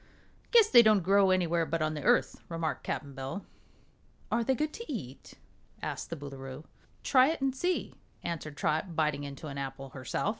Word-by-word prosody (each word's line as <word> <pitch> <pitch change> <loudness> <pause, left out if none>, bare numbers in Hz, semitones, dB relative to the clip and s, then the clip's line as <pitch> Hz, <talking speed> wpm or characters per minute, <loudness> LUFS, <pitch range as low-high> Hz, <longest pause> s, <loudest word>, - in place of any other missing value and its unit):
"Guess 455 -3 +6
they 240 - +10
don't 215 -4 +4
grow 195 +1 +5
anywhere 170 -2 +2
but 165 +1 -1
on 155 0 0
the 150 - -4
Earth," - - +2
remarked 165 -2 -2
Cap'n 140 -2 -4
Bill. 135 +9 -5 0.9
"Are 235 - +2
they 265 +3 +2
good 305 +3 -1
to 465 -8 -7
eat?" 135 - -7 0.4
asked - - -4
the - - -3
Boolooroo. 135 0 -8 0.4
"Try 260 -1 +5
it 320 - -1
and 270 -1 0
see," 355 +6 -1 0.3
answered 155 -3 -5
Trot, 160 +4 -1
biting 150 -2 +1
into 140 +2 -8
an 140 -2 -5
apple 135 0 -5
herself. 130 +8 -2
165 Hz, 180 wpm, -30 LUFS, 140-230 Hz, 0.9 s, they